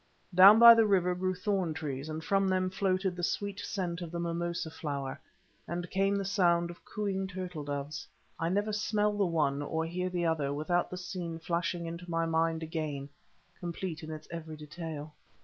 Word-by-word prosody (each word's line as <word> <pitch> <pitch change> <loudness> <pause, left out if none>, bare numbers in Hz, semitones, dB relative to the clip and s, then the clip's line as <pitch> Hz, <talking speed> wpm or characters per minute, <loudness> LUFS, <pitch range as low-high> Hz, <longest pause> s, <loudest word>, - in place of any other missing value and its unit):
Down 195 +4 +10
by 235 0 +11
the 225 -1 +4
river 180 -3 +3
grew 185 +1 -1
thorn 185 -4 -1
trees, 145 -1 -4
and 155 +1 -4
from 195 +1 +2
them 185 0 +1
floated 190 -1 0
the 175 - -5
sweet 200 +3 -2
scent 180 -4 -3
of 170 - -5
the 170 +1 -4
mimosa 170 -1 -2
flower, 140 -4 -4 0.5
and 175 +1 -3
came 195 +1 +2
the 200 -1 -1
sound 175 -3 +2
of 175 - -15
cooing 195 -2 -2
turtle 180 -4 -5
doves. 145 +1 -4 0.3
I 165 - 0
never 205 +3 0
smell 210 0 +1
the 200 -2 +2
one 150 -4 +1
or 160 +2 -1
hear 180 +2 -2
the 175 -1 -1
other 155 -4 +1
without 175 +4 0
the 180 - -6
scene 180 -2 -5
flashing 170 +1 -2
into 170 +1 -7
my 165 0 +1
mind 165 0 +1
again, 155 -3 -4 0.5
complete 170 -1 -4
in 155 - -8
its 155 -1 -7
every 160 -2 -6
detail. 155 -1 -7
170 Hz, 185 wpm, -31 LUFS, 160-185 Hz, 0.5 s, by